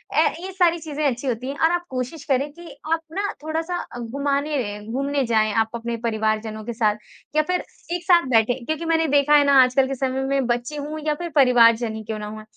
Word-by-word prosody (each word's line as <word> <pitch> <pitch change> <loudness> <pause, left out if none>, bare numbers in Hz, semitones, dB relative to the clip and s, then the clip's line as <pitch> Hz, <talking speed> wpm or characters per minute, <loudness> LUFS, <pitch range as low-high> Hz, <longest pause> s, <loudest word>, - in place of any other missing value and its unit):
अ, - - +4 0.2
ये 375 +2 -6
सारी 350 -2 +3
चीज़ें 305 -1 -5
अच्छी 265 0 -1
होती 250 0 -2
हैं 275 - -4
और 325 - +5
आप 350 0 -1
कोशिश 260 +4 -4
करें 280 0 0
कि 345 +1 -12 0.3
आप 330 - +1
ना 390 - -1 0.2
थोड़ा-सा 325 +3 -2 0.2
घुमाने 280 +5 -1 0.3
घूमने 275 +2 0
जाएँ 220 -2 +2
आप 225 0 +1
अपने 235 0 -3
परिवारजनों 220 -1 -1
के 235 - -4
साथ 215 -2 +1 0.4
या 310 - +5
फिर 360 0 0 0.3
एक 350 - -5
साथ 345 -5 +4
बैठे 230 0 +4
क्योंकि 315 +3 -3
मैंने 325 0 +2
देखा 290 +1 +4
है 290 - +6
ना 280 - +4
आजकल 255 +1 +2
के 270 - -3
समय 265 0 -1
में 275 -1 0
बच्चे 245 +4 -2
हो 295 +2 -5
या 300 - +3
फिर 345 +3 -5
परिवारजन 235 -4 +5
ही 220 - -6
क्यों 215 0 -5
ना 210 - -6
हो, 215 +1 -8
270 Hz, 220 wpm, -22 LUFS, 235-310 Hz, 0.4 s, है